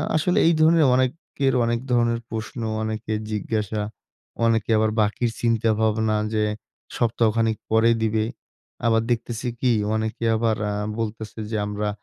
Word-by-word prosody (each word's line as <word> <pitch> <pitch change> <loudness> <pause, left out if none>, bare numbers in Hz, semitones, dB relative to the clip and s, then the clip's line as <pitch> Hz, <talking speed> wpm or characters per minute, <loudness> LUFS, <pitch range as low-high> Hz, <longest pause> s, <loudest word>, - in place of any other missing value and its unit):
আসলে 170 +3 +1
এই 170 - +5
ধরনের 160 -1 +5
অনেকের 135 +1 0
অনেক 115 0 0
ধরনের 120 -1 +2
প্রশ্ন, 115 +2 -5 0.2
অনেকের 110 0 -3
জিজ্ঞাসা, 105 0 -2 0.6
অনেকে 115 -1 +1
আবার 110 0 +2
বাকির 110 +3 0
চিন্তা 115 -1 +2
ভাবনা 110 0 +1 0.2
যে 105 - +2 0.5
সপ্তাহখানেক 115 -1 +1
পরে 110 +1 +5
দিবে। 110 0 +1 0.6
আবার 115 -1 +3
দেখতেছি 120 +1 -2
কি? 125 -2 +2 0.2
অনেকে 110 +1 -3
আবার 110 -1 +1
আ - - -1 0.3
বলতেছে 110 0 -5
যে, 110 - 0
"আমরা 105 0 -2
115 Hz, 135 wpm, -23 LUFS, 110-120 Hz, 0.6 s, এই